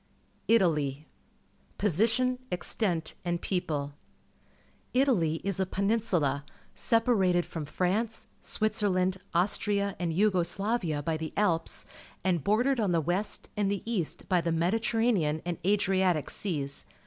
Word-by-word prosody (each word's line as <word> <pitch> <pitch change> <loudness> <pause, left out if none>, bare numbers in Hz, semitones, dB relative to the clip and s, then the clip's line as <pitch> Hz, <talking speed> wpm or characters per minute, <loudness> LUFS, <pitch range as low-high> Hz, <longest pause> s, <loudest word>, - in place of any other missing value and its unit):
ITALY 150 -9 +2
t^ - - -36
Position, 230 +7 +2
Extent, 175 -2 -1
and 175 -1 -1
People. 150 -7 -2 0.5
— - - -35
Italy 190 - +2
is 195 -2 -1
a 190 - +2
peninsula, 190 - 0 0.3
separated 200 -7 +2
from 160 -3 -5
France, 195 +8 -1 0.2
Switzer 215 -1 +1
land, 185 0 +1 0.2
Austria, 200 +2 +1
and 175 -2 -1
Yugo 185 +1 +3
Slavia 180 -6 -1
by 160 +1 -1
the 155 -1 -5
Alps, 170 -6 0 0.4
and 175 -5 +1
bordered 245 - +2
on 200 -5 +1
the 170 - +3
west 175 +6 -1
and 205 -1 +1
the 200 -2 -2
east 215 -9 -2
by 180 -2 +2
the 170 - -1
Mediterranean 190 -1 +1
and 175 -2 -3
Adriatic 190 -4 +2
Seas. 145 -8 -2
185 Hz, 130 wpm, -29 LUFS, 165-210 Hz, 0.5 s, Yugo